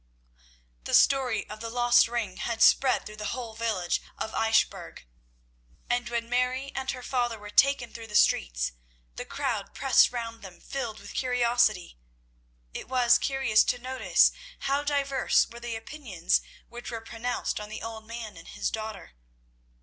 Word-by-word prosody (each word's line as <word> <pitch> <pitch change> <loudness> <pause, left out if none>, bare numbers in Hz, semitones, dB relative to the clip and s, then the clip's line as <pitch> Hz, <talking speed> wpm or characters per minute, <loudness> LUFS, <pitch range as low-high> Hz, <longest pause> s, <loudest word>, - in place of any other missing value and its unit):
The - - +2
story 260 -5 +3
of 215 - -9
the 230 +1 -5
lost 240 0 +4
ring 230 -6 -3
had 230 -1 0
spread 265 -1 +4
through 215 0 -9
the 210 +3 -3
whole 235 -3 -6
village 220 -6 -1 0.2
of 220 - -4
Eichbourg, 220 - 0 0.9
and 245 0 0
when 235 -1 -2
Mary 250 +3 0
and 265 0 -4
her 250 -1 -3
father 240 -3 -1
were 210 0 -10
taken 270 0 +3
through 230 -1 -8
the 210 - -8
streets, - - +2 0.4
the - - -6
crowd - - -3
pressed - - +5
round 230 -2 -5
them 190 -3 -11
filled 235 -6 -5
with 205 - -11
curiosity. 240 - +1 0.7
It - - -7
was 245 -2 +4
curious 270 -6 +3
to 245 - +1
notice 255 +1 +3 0.3
how 275 +1 +1
diverse 280 -2 +2
were 235 0 -11
the 240 -1 -5
opinions 225 - -1 0.3
which 240 0 -9
were 230 -1 -5
pronounced 235 +1 -3
on 210 0 -8
the 220 - -7
old 220 -1 -7
man 225 -4 -7
and 165 - -12
his - - -3
daughter. 215 -3 -6
235 Hz, 160 wpm, -28 LUFS, 220-250 Hz, 0.9 s, pressed